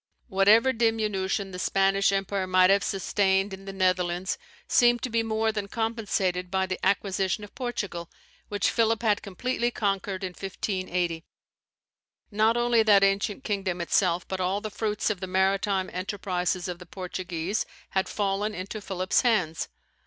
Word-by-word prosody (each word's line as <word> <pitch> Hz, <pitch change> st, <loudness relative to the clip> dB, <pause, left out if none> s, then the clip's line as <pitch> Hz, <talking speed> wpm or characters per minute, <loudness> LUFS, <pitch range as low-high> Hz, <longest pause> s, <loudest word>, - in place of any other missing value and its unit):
Whatever 215 Hz, +6 st, +5 dB
diminution 210 Hz, -4 st, 0 dB
the 180 Hz, -, -6 dB
Spanish 195 Hz, +2 st, +2 dB
empire 195 Hz, -1 st, -1 dB
might 185 Hz, 0 st, +5 dB
have 200 Hz, 0 st, +4 dB
sustained 195 Hz, 0 st, +1 dB
in 195 Hz, 0 st, -9 dB
the 195 Hz, -, -5 dB
Netherlands, 185 Hz, -1 st, 0 dB, 0.3 s
seemed 240 Hz, 0 st, +4 dB
to 255 Hz, -, -2 dB
be 230 Hz, 0 st, +2 dB
more 220 Hz, 0 st, 0 dB
than 210 Hz, -2 st, -4 dB
compensated 200 Hz, -5 st, -1 dB
by 190 Hz, 0 st, +1 dB
the 185 Hz, 0 st, -5 dB
acquisition 195 Hz, 0 st, 0 dB
of 205 Hz, -, -11 dB
Portugal, 205 Hz, -9 st, -4 dB, 0.4 s
which 205 Hz, -2 st, 0 dB
Philip 230 Hz, 0 st, +1 dB
had 210 Hz, -2 st, +2 dB
completely 240 Hz, +5 st, -1 dB
conquered 195 Hz, -3 st, -2 dB
in 185 Hz, -, -3 dB
1580. 180 Hz, -3 st, -3 dB, 1.1 s
Not 220 Hz, +3 st, +3 dB
only 240 Hz, -1 st, +3 dB
that 205 Hz, -2 st, +5 dB
ancient 200 Hz, +5 st, +1 dB
kingdom 195 Hz, -5 st, -2 dB
itself, 170 Hz, 0 st, +1 dB
but 190 Hz, -, -4 dB
all 185 Hz, +2 st, 0 dB
the 215 Hz, 0 st, -6 dB
fruits 210 Hz, 0 st, -1 dB
of 200 Hz, -, -4 dB
the 190 Hz, -, -4 dB
maritime 190 Hz, +1 st, +1 dB
enterprises 185 Hz, -1 st, -2 dB
of 175 Hz, -1 st, -5 dB
the 180 Hz, -, -12 dB
Portuguese 180 Hz, +1 st, -3 dB, 0.2 s
had 190 Hz, 0 st, 0 dB
fallen 205 Hz, +1 st, -1 dB
into 195 Hz, +4 st, -6 dB
Philip's 185 Hz, -1 st, 0 dB
hands. 185 Hz, -10 st, +1 dB
195 Hz, 150 wpm, -27 LUFS, 185-215 Hz, 1.1 s, Whatever